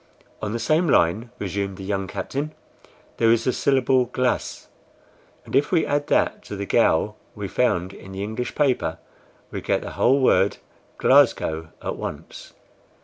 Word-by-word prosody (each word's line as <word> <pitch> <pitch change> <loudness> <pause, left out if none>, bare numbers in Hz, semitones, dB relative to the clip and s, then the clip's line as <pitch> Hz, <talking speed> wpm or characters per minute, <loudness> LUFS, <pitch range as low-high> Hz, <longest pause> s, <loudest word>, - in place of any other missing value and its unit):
"On 105 - -3
the 115 - -1
same 155 +8 +1
line," 105 +4 +2
resumed 100 -1 -3
the 95 - -8
young 95 0 -2
captain, 140 +11 -4 0.6
"there 115 -1 +4
is 115 0 +3
the 130 - +1
syllable 130 -2 +2
GLAS 125 +1 -2 0.8
and - - -5
if 140 +2 +2
we 170 -3 +3
add 145 0 0
that - - +1
to - - -6
the 100 0 -4
GOW 105 -2 +2 0.2
we 105 -1 -4
found 95 -4 0
in 95 - -12
the 95 +1 -4
English 110 +4 -4
paper, 140 -4 +1 0.5
we - - -4
get - - 0
the - - -6
whole 135 +3 +3
word 100 -6 +3 0.4
GLASGOW 80 0 +3 0.2
at - - -3
once. - - -8
115 Hz, 160 wpm, -23 LUFS, 95-130 Hz, 0.8 s, there